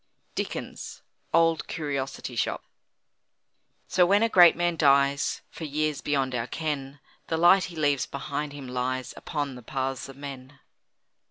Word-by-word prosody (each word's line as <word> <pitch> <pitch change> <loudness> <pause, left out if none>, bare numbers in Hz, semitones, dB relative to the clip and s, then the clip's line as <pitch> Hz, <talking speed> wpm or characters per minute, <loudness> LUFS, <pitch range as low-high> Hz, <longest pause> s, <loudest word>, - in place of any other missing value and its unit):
DICKENS: - - -5 0.3
"Old 165 -1 +3
Curiosity 140 -4 -4
Shop." - - -1 1.2
So, 180 - +4
when 200 +5 +4
a 230 - +3
great 175 -5 +7
man 175 0 0
dies, 140 -2 +3
For - - -9
years 155 0 -1
beyond 135 -3 0
our 120 -1 -2
ken, 145 -3 -4 0.3
The 160 - -1
light 175 +3 +6
he 175 - -9
leaves 145 -4 +1
behind 145 +1 -4
him 140 -2 -8
lies 130 +1 -2
Upon 145 -3 -3
the 125 - -10
paths 135 +2 -3
of 135 - -11
men. 140 -1 -9
145 Hz, 145 wpm, -27 LUFS, 135-160 Hz, 1.2 s, great